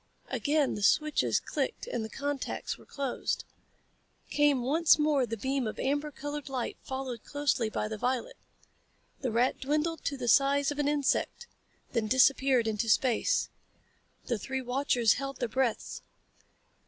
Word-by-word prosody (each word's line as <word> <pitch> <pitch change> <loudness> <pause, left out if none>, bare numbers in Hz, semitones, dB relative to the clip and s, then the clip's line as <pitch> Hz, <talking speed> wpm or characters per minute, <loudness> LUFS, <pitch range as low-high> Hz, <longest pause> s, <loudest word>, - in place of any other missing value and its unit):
Again 295 -1 +1
the 210 - -5
switches 305 +9 +3
clicked - - -3
as 360 - -2
the 220 - -5
contacts 285 +2 -3
were - - -18
closed. 275 -3 -2 0.9
Came 290 -4 +3
once 310 +6 +4
more 300 -4 +2
the 225 - -4
beam 265 +2 -1
of 215 - -5
amber 290 +3 0
colored 290 0 -6
light 255 -3 -3
followed 260 -3 -5
closely 285 -6 0
by 215 - -2
the 215 -1 -5
violet. 250 +1 -1 0.8
The 255 - -2
rat 240 +3 +1
dwindled 300 +3 -1
to 280 - -1
the 245 -2 -4
size 280 +3 +4
of 290 - -5
an 290 - +1
insect, 295 - 0 0.5
then 230 -3 0
disappeared 260 0 +4
into 220 0 -1
space. 245 +1 +2 0.8
The 235 -3 -1
three 265 +5 -3
watchers 245 -3 +2
held 275 -1 -4
their 245 - -1
breaths. 245 -1 -1
265 Hz, 150 wpm, -30 LUFS, 240-290 Hz, 0.9 s, once